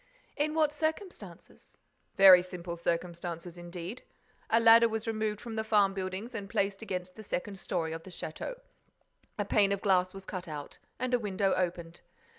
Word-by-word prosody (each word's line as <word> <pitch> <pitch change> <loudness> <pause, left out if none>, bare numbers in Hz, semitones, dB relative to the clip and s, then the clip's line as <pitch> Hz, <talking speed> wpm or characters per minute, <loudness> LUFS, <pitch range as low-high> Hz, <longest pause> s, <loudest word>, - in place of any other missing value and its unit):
"In 305 +1 0
what 305 -2 +3
circumstances?" 320 +5 -5 0.4
"Very 190 -2 +9
simple 180 -1 -6
circumstances, 170 0 -3
indeed. 175 +5 -7 0.5
A 225 - +4
ladder 230 0 +7
was 220 0 -3
removed 215 -2 -1
from 230 0 -7
the 220 0 -1
farm 205 -3 +3
buildings 190 +5 -4
and 200 -3 -5
placed 195 0 0
against 185 -4 -5
the 220 - -9
second 195 0 -4
story 165 -4 -2
of 165 - -5
the 190 - -12
château. 185 - -6 0.8
A 205 - -1
pane 200 -1 +3
of 200 -1 -1
glass 185 -2 +3
was 195 0 -10
cut 185 -2 -6
out 150 -2 -7 0.2
and 255 0 -2
a 245 - +4
window 195 -2 0
opened. 175 -2 -2
195 Hz, 170 wpm, -30 LUFS, 180-220 Hz, 0.8 s, Very